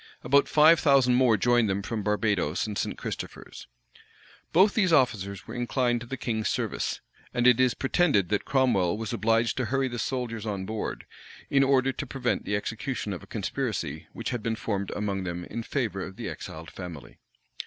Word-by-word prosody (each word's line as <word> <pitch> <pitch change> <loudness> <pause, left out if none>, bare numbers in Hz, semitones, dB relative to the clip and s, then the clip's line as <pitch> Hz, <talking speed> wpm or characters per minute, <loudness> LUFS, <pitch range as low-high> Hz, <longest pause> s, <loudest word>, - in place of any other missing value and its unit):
About 140 +3 +4
five 155 +2 +6
thousand 135 -4 +4
more 125 -3 +4
joined 120 +1 +3
them 100 +1 -1
from 110 +1 -3
Barbadoes 105 -6 0
and 105 -1 -4
St. - - -2
Christopher's. - - -7 0.8
Both 190 +5 +5
these 190 -5 +2
officers 105 - +1
were 115 - -8
inclined 120 0 0
to 120 - -8
the 135 - -5
king's 110 -3 -1
service;[*] - - -2 0.3
and 120 0 +1
it 125 -1 +6
is 130 -2 +3
pretended 135 - +2
that 105 - 0
Cromwell 115 -10 +2
was 110 0 -4
obliged 115 0 +1
to 130 - 0
hurry 135 +4 0
the 120 -2 -5
soldiers 115 -3 -3
on 100 -3 -3
board, 110 +1 -4 0.5
in 140 -1 +5
order 135 -1 +3
to 140 - -6
prevent 125 -1 -1
the 105 - 0
execution 115 +1 -3
of 90 - -6
a - - -14
conspiracy - - -3
which - - -4
had 120 -3 -2
been 115 +1 -1
formed 100 -3 -3
among 100 -2 -2
them 90 -1 -4
in 115 - -5
favor 115 -6 -2
of 95 - -8
the - - -6
exiled 80 +1 -8
family. 90 -5 -9
115 Hz, 185 wpm, -27 LUFS, 100-130 Hz, 0.8 s, five